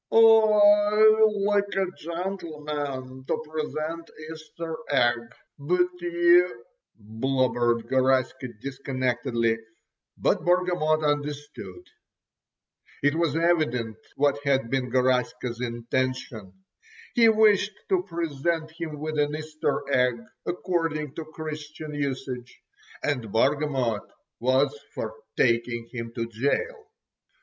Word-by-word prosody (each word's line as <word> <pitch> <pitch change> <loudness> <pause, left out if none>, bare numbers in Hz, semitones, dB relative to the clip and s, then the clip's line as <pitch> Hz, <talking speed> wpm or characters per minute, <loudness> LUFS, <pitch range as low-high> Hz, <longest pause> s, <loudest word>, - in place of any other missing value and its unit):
"I——like 210 -1 +5
a 195 0 +2
gentleman——to 150 -7 -4
present——Easter 160 +1 -5
egg——but 140 +7 0
you——" 175 -6 +3 0.3
blubbered 120 +1 0
Garaska 130 0 +1
disconnectedly; 125 -3 -1 0.6
but - - +1
Bargamot 175 -3 +2
understood. 145 - -3 1.2
It 145 0 +4
was 165 -2 0
evident 155 -10 +1 0.2
what 145 0 +2
had 135 -4 +1
been 130 -2 0
Garaska's 125 -1 0
intention. 120 -3 -3 0.6
He 230 -2 +6
wished 215 -2 +4
to 380 -2 +3
present 165 - -2
him 160 -2 -6
with 155 0 -3
an 145 0 +1
Easter 155 -2 -2
egg 125 -3 +2 0.3
according 165 -5 -1
to 160 - -6
Christian 155 -1 -7
usage, 130 -3 -4 0.4
and 125 -8 -1
Bargamot 130 -3 +1 0.3
was 130 +3 +2 0.2
for - - -4 0.2
taking 115 -1 +1
him 115 -2 -5
to 115 - -1
gaol. 280 - -2
145 Hz, 90 wpm, -26 LUFS, 125-170 Hz, 1.2 s, He